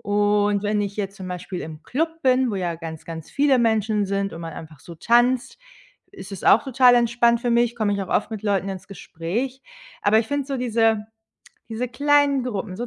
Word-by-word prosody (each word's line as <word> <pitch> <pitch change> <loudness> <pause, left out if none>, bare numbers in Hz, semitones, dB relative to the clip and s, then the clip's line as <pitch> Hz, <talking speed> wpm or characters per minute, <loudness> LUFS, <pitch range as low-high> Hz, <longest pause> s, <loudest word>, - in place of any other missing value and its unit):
Und 205 0 +1
wenn 210 0 0
ich 200 -1 -3
jetzt 195 -1 -4
zum 190 -2 -8
Beispiel 180 0 -6
im 155 0 -8
Club 325 - -3
bin, 255 -1 +3
wo - - -2
ja 175 -3 -2
ganz, 160 -2 -8
ganz 165 -2 -8
viele 280 -2 +3
Menschen 215 -3 +1
sind 195 0 -2
und 165 - -8
man 165 -1 -6
einfach 155 -2 -11
so 170 +4 -12
tanzt, 245 - +2 0.5
ist 205 - -10
es 195 - -8
auch 220 - +6
total 255 -2 +5
entspannt 235 0 +3
für 240 0 -1
mich, 235 0 +2
komme 215 -3 0
ich 200 - -3
auch 195 - -4
oft 210 - 0
mit 215 -1 -6
Leuten 195 -2 0
ins 190 -2 -7
Gespräch. 200 +8 -5 0.4
Aber 215 +2 +4
ich 220 - -5
finde 285 -1 -2
so 275 -1 -3
diese 225 -3 +1 0.6
diese 235 +2 -3
kleinen 285 0 +2
Gruppen, 200 -5 -4
so 240 - -4
215 Hz, 210 wpm, -23 LUFS, 195-245 Hz, 0.6 s, auch